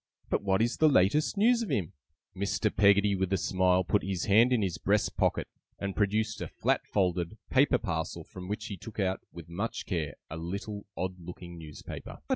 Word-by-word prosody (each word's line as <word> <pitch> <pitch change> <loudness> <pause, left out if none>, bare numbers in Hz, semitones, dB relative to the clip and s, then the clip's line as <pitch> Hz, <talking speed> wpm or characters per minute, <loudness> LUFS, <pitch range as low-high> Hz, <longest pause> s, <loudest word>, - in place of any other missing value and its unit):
But - - +2
what 100 +1 +2
is 120 +1 0
the 155 - +5
latest 145 - +3
news 235 +3 +4
of 230 - -3
him?' 90 -6 -1 0.4
Mr. 100 +2 0
Peggotty, 100 +1 +5
with 95 -1 -1
a - - +4
smile, 95 -1 +2
put 100 +3 +2
his 95 -2 -2
hand 115 +5 +5
in 120 -4 +3
his 90 -5 -2
breast - - +1
pocket, - - +1 0.3
and 100 -1 -4
produced 105 +1 0
a - - -3
flat - - 0
folded, 90 -3 0
paper - - +5
parcel, - - -3
from 90 0 -10
which 105 +2 -3
he 100 - -5
took 110 +4 -10
out, 95 -1 0
with 85 -2 -10
much 100 +7 -3
care, 80 -7 -2
a 80 - -6
little 100 +5 -5
odd 90 0 -3
looking 85 0 -9
newspaper. 75 -2 -8
95 Hz, 195 wpm, -30 LUFS, 90-105 Hz, 0.4 s, the